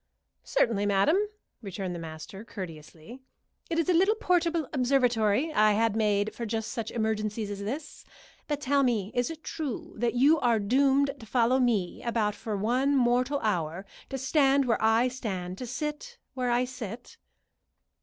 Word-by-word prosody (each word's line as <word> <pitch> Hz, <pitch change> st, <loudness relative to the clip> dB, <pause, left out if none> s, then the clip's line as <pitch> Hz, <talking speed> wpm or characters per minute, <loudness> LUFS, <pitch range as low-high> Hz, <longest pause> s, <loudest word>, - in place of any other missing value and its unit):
"Certainly, 225 Hz, -, +1 dB
madam," 200 Hz, -, +3 dB, 0.5 s
returned 190 Hz, -3 st, -5 dB
the 175 Hz, -, -5 dB
master, 165 Hz, +5 st, -8 dB
courteously. 175 Hz, -, -9 dB, 0.5 s
"It 330 Hz, -, -1 dB
is 335 Hz, -, +1 dB
a 365 Hz, -, +3 dB
little 385 Hz, +6 st, +4 dB
portable 340 Hz, -, +1 dB
observatory 250 Hz, 0 st, +2 dB
I 215 Hz, -5 st, +4 dB
had 225 Hz, 0 st, +1 dB
made 210 Hz, -1 st, +1 dB
for 235 Hz, -, -6 dB
just 220 Hz, -1 st, -3 dB
such 225 Hz, -2 st, -4 dB
emergencies 215 Hz, -1 st, -2 dB
as 200 Hz, -, -5 dB
this. 260 Hz, +10 st, -6 dB, 0.4 s
But, 295 Hz, -1 st, -2 dB
tell 280 Hz, 0 st, +2 dB
me, 225 Hz, -6 st, 0 dB
is 245 Hz, 0 st, 0 dB
it 320 Hz, -1 st, -8 dB
true 295 Hz, -8 st, -5 dB
that 235 Hz, +2 st, 0 dB
you 290 Hz, +6 st, +5 dB
are 240 Hz, -4 st, +3 dB
doomed 270 Hz, +6 st, +3 dB
to 225 Hz, -, -11 dB
follow 250 Hz, +2 st, +2 dB
me 220 Hz, -8 st, 0 dB
about 225 Hz, -3 st, 0 dB
for 210 Hz, 0 st, -4 dB
one 255 Hz, +7 st, +1 dB
mortal 250 Hz, +3 st, +2 dB
hour 175 Hz, -3 st, -1 dB, 0.2 s
to 270 Hz, -, -3 dB
stand 275 Hz, 0 st, +3 dB
where 235 Hz, -2 st, +1 dB
I 225 Hz, +3 st, +4 dB
stand, 190 Hz, -8 st, -5 dB
to 250 Hz, -, -5 dB
sit 300 Hz, -, -5 dB, 0.2 s
where 255 Hz, -2 st, -1 dB
I 240 Hz, +1 st, +2 dB
sit?" 245 Hz, -2 st, -8 dB
240 Hz, 165 wpm, -28 LUFS, 210-275 Hz, 0.5 s, you